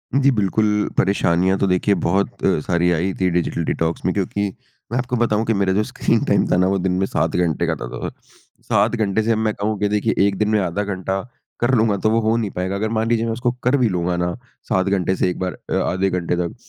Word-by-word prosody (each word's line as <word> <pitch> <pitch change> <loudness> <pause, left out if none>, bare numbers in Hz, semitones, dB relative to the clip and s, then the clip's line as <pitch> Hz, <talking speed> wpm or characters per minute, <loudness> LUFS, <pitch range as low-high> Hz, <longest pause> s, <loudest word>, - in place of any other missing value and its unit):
जी, 140 0 +4
बिल्कुल। 105 -1 +1
परेशानियाँ 95 -1 +2
तो 100 - +2
देखिए 95 +2 +2
बहुत 95 +3 +1 0.4
सारी 90 -1 +2
आई 90 +3 0
थी 90 - +3
डिजिटल 85 -1 -1
डिटॉक्स 80 +1 -2
में 90 - +2
क्योंकि 100 +1 -1 0.4
मैं 120 - 0
आपको 125 0 -1
बताऊँ 110 -2 +1
कि 115 - +1
मेरा 100 -2 +1
जो 105 +3 +2
स्क्रीन - - 0
टाइम - - +2
था - - +4
ना 90 +1 +3
वो 95 +1 +1
दिन 95 0 0
में 95 - +2
7 80 -4 -1
घंटे 85 -1 +1
का 85 - +1
त - - -12
त - - -5
था। - - -2 0.5
7 - - +2
घंटे 110 -1 0
से 115 - +1
अब 110 - +2
मैं 110 -1 0
कहूँ 105 +1 -2
कि 105 - +1
देखिए 105 +2 +1
1 100 - -1
दिन 105 +1 +1
में 110 -1 +3
आधा 95 +1 -1
घंटा 95 -1 -2 0.4
कर 120 +3 +1
लूँगा 110 -3 +2
तो 110 - +1
वो 115 +1 +3
हो 115 - +3
नहीं 110 -4 -2
पाएगा। 95 +2 -3
अगर 110 +2 -1
मान 110 0 0
लीजिए 115 -1 +1
मैं 115 - -1
उसको 120 +2 0
कर 125 +3 +3
भी 125 -4 +2
लूँगा 90 -1 -1
ना 90 0 -1 0.4
7 95 0 +2
घंटे 95 -1 +1
से 90 - +1
एक 90 - -5
बार 90 -1 -2 0.2
अ, - - -1 0.2
आधे 95 +1 0
घंटे 90 -2 -1
तक, 85 -1 -3
100 Hz, 250 wpm, -20 LUFS, 90-110 Hz, 0.5 s, जी